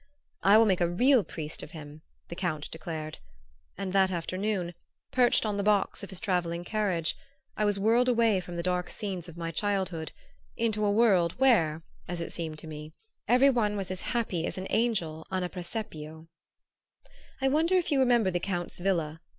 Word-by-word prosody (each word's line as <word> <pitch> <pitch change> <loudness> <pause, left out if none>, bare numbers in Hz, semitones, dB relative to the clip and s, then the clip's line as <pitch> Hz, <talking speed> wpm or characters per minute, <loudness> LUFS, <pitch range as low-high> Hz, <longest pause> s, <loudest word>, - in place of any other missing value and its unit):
"I 200 +2 +6
will 225 - +6
make 190 -4 +2
a 170 - +3
real 245 +6 +4
priest 155 -3 -5
of 155 - -10
him," 150 0 -10 0.3
the 170 - -7
Count 165 -5 -3
declared; 155 -1 -6 0.6
and 190 -1 -4
that 190 -1 +4
afternoon, 185 +1 -2 0.4
perched 245 -2 +4
on 210 -1 -1
the - - 0
box 205 -1 +2
of 200 - -8
his 190 -3 -5
travelling 175 -3 -1
carriage, 185 -5 0 0.4
I 215 - +1
was 205 -1 +2
whirled 230 +5 +3
away 230 -5 +3
from 175 -1 -8
the 170 - -3
dark 180 0 0
scenes 185 -5 -5
of 170 - -12
my 165 -1 -3
childhood 185 -3 -2 0.5
into 220 -2 0
a 205 - +3
world, 200 -6 +4
where, 165 -12 +3 0.2
as 175 0 -4
it 170 - -4
seemed 160 -2 -4
to 160 - -8
me, 155 0 -8 0.3
every 255 +3 +6
one 210 -5 +1
was 190 -2 -4
as 185 - -3
happy 215 -9 -1
as - - -5
an 185 - -4
angel 175 -9 0
on 185 -1 -1
a 180 - -2
presepio. 160 -5 -6 1.1
I 270 - +1
wonder 320 +6 +2
if 355 -3 +1
you 280 - +3
remember 240 -6 +4
the 175 - 0
Count's 175 -1 -3
villa? 165 -4 -1
185 Hz, 190 wpm, -29 LUFS, 170-215 Hz, 1.1 s, I